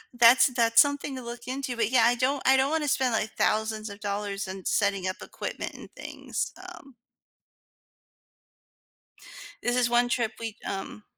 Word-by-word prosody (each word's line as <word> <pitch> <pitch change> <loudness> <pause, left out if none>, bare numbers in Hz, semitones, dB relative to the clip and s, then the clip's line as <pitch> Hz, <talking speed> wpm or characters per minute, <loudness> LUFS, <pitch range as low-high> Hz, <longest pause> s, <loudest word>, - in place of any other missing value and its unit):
That's 240 +1 +7
that's 230 -2 +3
something 285 -1 +2
to 255 - -7
look 235 0 -8
into, 260 -1 -3
but 225 -3 0
yeah, 250 -3 +5
I 240 - +5
don't 260 +3 0
I 265 - +6
don't 265 +1 +2
wanna 310 -1 0
spend, 260 -3 +1
like, 220 0 -1
thousands 220 0 0
of 200 0 -10
dollars 200 -1 -3
in 190 0 -7
setting 200 -3 +1
up 185 - -3
equipment - - -6
and - - -12
things. - - -5 0.2
Um. 275 -4 -16 2.7
This 245 +1 +1
is 245 -1 +2
one 240 0 +3
trip 235 -2 0
we, 225 -1 -5
um 195 +2 -6
235 Hz, 165 wpm, -27 LUFS, 215-260 Hz, 2.7 s, That's